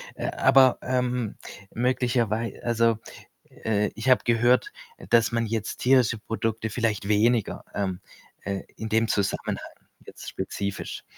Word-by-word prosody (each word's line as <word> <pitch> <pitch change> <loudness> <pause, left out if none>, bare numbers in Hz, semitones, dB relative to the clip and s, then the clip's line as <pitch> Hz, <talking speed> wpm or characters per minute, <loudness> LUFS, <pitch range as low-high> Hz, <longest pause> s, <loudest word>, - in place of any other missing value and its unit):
Äh, - - -4
aber, 130 -2 +5
ähm, 125 -3 -1 0.4
möglicherwei 120 -2 0
also, 115 -1 +2 0.5
äh, 105 -1 -1
ich 115 +4 -2
habe 130 - +5
gehört, 120 +1 +3 0.4
dass 115 0 +4
man 115 -1 0
jetzt 110 -1 -3
tierische 125 -4 +3
Produkte 110 0 -3
vielleicht 110 -3 -1
weniger, 110 +1 +2
ähm, 95 -3 -2 0.4
äh 100 -1 -3 0.2
in 110 - -5
dem 110 +1 +2
Zusammenhang 100 -2 -1 0.5
jetzt - - -9
spezifisch 100 -1 -5
115 Hz, 125 wpm, -26 LUFS, 105-120 Hz, 0.5 s, aber